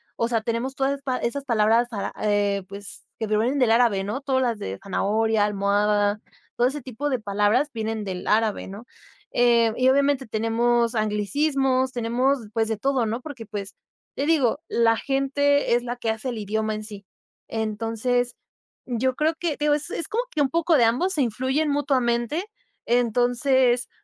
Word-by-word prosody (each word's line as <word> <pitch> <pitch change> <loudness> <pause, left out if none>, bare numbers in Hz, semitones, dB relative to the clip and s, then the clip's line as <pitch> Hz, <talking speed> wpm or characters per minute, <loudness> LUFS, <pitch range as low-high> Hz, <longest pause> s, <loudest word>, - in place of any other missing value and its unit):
O 230 - 0
sea, 230 -2 0
tenemos 235 +4 -3
todas 270 +1 +1
esas 280 -1 -8
pa 255 -2 -1
esas 275 +4 -3
palabras 230 0 +3
para, 210 -5 -4
eh, 205 -2 +1
pues, 200 0 -8
que 220 - -2
provienen 225 +6 +1
del 245 -3 +3
árabe, 225 -4 +3
¿no?, 210 +7 -4
todas 265 -2 0
las 235 -3 -1
de 95 +1 -5
zanahoria, 215 +2 +1
almohada. 205 +1 +1 0.3
Todo 245 +1 +3
ese 290 +2 -4
tipo 260 +4 -4
de 255 - 0
palabras 210 +7 +1
vienen 220 -1 -3
del 185 -2 -5
árabe, 220 -1 +1
¿no?, 205 +5 -9 0.5
eh, 235 -2 +3
y 255 +1 +3
obviamente 280 0 +2
tenemos 235 +2 +1
anglicismos, 260 - +1
tenemos, 250 +3 0
pues 225 -1 +1
de 220 - -1
todo, 265 +1 0
¿no?, 225 +3 -2
porque, 260 -5 -8
pues, 205 -2 -6 0.4
te 280 - -1
digo, 290 -5 +2
la 230 -1 +3
gente 280 0 +1
es 240 - 0
la 245 0 -4
que 230 -2 -3
hace 220 +3 -2
el 235 - -4
idioma 215 +1 -2
en 215 - -6
sí. 205 -2 -9 0.4
Entonces, 225 +3 -1 0.5
yo 255 +1 0
creo 310 +3 +1
que, 330 -4 -2
digo, 295 0 +2
es 300 +3 -3
es 335 - -1
como 470 +3 -1
que 300 - 0
un 270 - +2
poco 335 +2 +2
de 235 - +5
ambos, 340 +12 +1
se 300 - +1
influyen 260 +5 0
mutuamente. 270 - 0 0.4
Entonces 245 +1 +2
235 Hz, 175 wpm, -24 LUFS, 215-270 Hz, 0.5 s, de